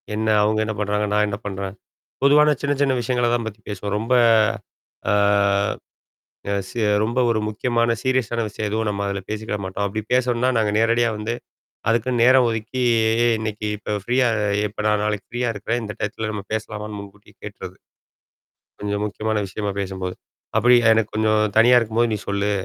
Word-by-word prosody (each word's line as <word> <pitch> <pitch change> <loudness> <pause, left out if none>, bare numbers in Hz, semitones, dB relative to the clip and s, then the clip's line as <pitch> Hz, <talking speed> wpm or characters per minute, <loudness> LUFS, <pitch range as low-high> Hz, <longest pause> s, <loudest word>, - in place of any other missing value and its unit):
என்ன 110 +1 -2 0.2
அவுங்க 110 +1 +1
என்ன 110 - -2
பண்றாங்க? 105 0 0
நான் 105 0 +3
என்ன 100 -1 -3
பண்றேன்? 95 -1 -5 0.5
பொதுவான 150 +2 +5
சின்ன, 140 +1 +1
சின்ன 135 -2 +3
விஷயங்கள 120 0 0
தான் 115 - -2
பத்தி 110 0 -8
பேசுவோம். 100 0 -4
ரொம்ப. 115 +3 -1 1.0
ஆ. - - +3 1.4
அ - - +1 0.2
செ 120 - -4 0.2
ரொம்ப 120 +4 -1
ஒரு 115 -2 +1
முக்கியமான 115 +2 0
சீரியஸான 130 -3 0
விஷயம் 105 +1 -4
எதுவும் 110 +1 -1
நம்ம 100 -1 -3
அதில 100 0 -2
பேசிக்கிட 110 0 -3
மாட்டோம். 95 +2 -3
அப்படி 110 +2 -3
பேசோனும்னா 125 0 +2
நாங்க 110 -2 +1
நேரடியா 115 +1 +3
வந்து, 110 +2 -3 0.6
அதுக்குன்னு 115 +1 +1
நேரம் 130 0 +6
ஒதுக்கி 115 +3 -3 0.6
இன்னைக்கு 110 -1 -4
இப்ப 105 0 -4
ஃப்ரீயா? 125 +3 +2 0.4
எப்ப 105 - -16
நான் 105 -1 +2
நாளைக்கு 105 -1 -2
ஃப்ரீயா 120 0 -1
இருக்கிறேன். 115 +3 -2
இந்த 105 -1 -5
டயத்தல 110 +1 -3
நம்ம 105 -2 -5
பேசலாமான்னு 105 -1 -4
முன்கூட்டி 100 +1 -13
கேட்ருவன். 95 -3 -9 1.0
கொஞ்சம் 105 0 -2
முக்கியமான 110 +1 -2
விஷயமா 100 +2 -4
பேசும்போது. 95 -1 -4 0.4
அப்படி 125 +3 +6 0.2
எனக்கு 110 -1 +1
கொஞ்சம் 110 0 +2 0.2
தனியா 120 +2 +6
இருக்கும்போது 115 +1 0
நீ - - -3
சொல்லு. 100 0 0
110 Hz, 160 wpm, -22 LUFS, 105-120 Hz, 1.4 s, நேரம்